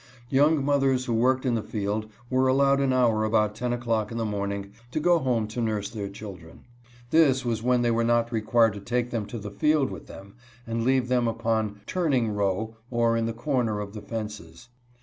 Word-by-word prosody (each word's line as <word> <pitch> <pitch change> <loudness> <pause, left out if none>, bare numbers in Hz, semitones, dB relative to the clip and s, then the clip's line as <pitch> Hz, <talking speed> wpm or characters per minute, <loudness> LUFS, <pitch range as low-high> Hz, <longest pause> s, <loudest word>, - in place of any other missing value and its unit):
Young 145 +2 +3
mothers 135 -3 +2
who 120 - -1
worked 130 +4 +2
in 125 - +2
the 115 - 0
field 105 +1 -3 0.2
were 130 +1 +2
allowed 140 +1 +3
an 135 -1 +2
hour 120 -4 +3
about 105 -1 +2
ten 120 +3 -3
o'clock 115 -3 -1
in 115 - -4
the 115 - -1
morning 100 -1 -3 0.2
to 125 - -2
go 175 +2 +4
home 125 -6 0
to 120 +3 -4
nurse 105 -3 -2
their 100 -3 -5
children. 95 -5 -11 0.5
This 140 -5 +4
was 115 -2 -1
when 125 0 +2
they 120 - +2
were 115 0 +1
not 120 0 +2
required 115 0 +3
to 105 - -7
take 120 +3 -1
them 110 -4 -2
to 115 - -6
the 105 -2 -7
field 145 +6 +2
with - - -9
them, 100 +1 -12 0.3
and 115 0 -2
leave 130 0 +2
them 125 -1 +2
upon 110 -2 -1
" - - -33
turning 135 - 0
row," 105 +2 -1
or 115 -1 +2
in 115 0 0
the - - -1
corner 115 -3 -1
of 100 -1 -6
the 105 - -7
fences. 105 -2 -7
115 Hz, 210 wpm, -26 LUFS, 105-130 Hz, 0.5 s, go